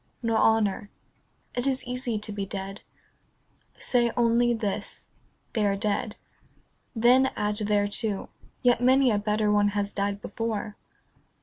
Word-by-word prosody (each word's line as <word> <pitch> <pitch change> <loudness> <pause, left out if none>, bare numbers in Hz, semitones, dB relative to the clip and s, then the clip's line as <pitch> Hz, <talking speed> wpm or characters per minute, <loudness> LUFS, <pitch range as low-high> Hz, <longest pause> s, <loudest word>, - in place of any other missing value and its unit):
Nor 230 -1 +1
honour. 215 -2 +2 0.6
It 245 +2 -1
is 265 -1 -1
easy 250 -2 -3
to 210 0 -6
be 200 -1 -3
dead. 195 0 -6 1.0
Say 240 -2 +1
only 240 0 +3
this, 220 -4 -3 0.2
" - - -42
They 220 - +1
are 200 -1 +2
dead." 210 +1 -1 0.8
Then 250 +3 +5
add 210 0 -1
thereto, 205 0 0 0.2
" - - -31
Yet 245 -1 +4
many 260 0 +4
a 205 - +1
better 210 0 +1
one 205 0 +3
has 200 0 -1
died 200 0 -1
before." 215 0 -4
215 Hz, 140 wpm, -26 LUFS, 205-240 Hz, 1.0 s, Then